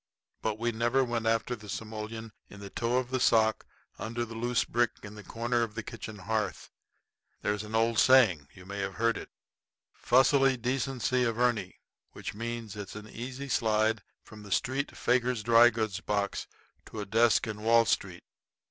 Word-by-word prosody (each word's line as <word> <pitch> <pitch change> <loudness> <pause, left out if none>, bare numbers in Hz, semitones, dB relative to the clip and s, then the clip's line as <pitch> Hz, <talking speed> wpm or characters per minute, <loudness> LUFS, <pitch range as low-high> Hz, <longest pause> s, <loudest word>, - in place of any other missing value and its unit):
But 110 -1 -1
we 120 +1 0
never 120 +4 +2
went 120 -2 -2
after 115 +2 +1
the 105 -2 -13
simoleon 110 +2 -6 0.2
in 100 - -12
the 100 -1 -9
toe 120 +1 0
of 130 0 -2
the 130 - 0
sock 110 -3 +3 0.3
under 115 +2 -3
the 115 - -9
loose 120 +1 0
brick 120 0 +1
in 105 0 -8
the 105 - -10
corner 120 +2 -1
of 110 -2 -2
the - - -4
kitchen 110 -1 -8
hearth. 105 -1 -3 0.7
There's 105 0 0
an 105 +1 -5
old 115 0 +2
saying 110 - +5
you 90 - -13
may 100 +2 -6
have 95 -1 -3
heard 115 -1 0 0.7
'fussily 135 +1 +4
decency 125 0 0
averni' 115 -4 0 0.4
which - - -6
means 115 -1 -5
it's 105 -1 -7
an 105 0 -8
easy 130 +5 -6
slide 110 -3 +1 0.2
from 110 -1 -13
the 100 -1 -11
street 130 +7 -1
faker's 125 -2 +1
dry 120 +1 +7
goods 110 -4 -2
box 100 -1 -2 0.4
to 110 - -8
a 105 - -3
desk 115 +2 +3
in 105 -2 -5
Wall 115 +1 +5
Street. - - -1
115 Hz, 175 wpm, -29 LUFS, 105-120 Hz, 0.7 s, dry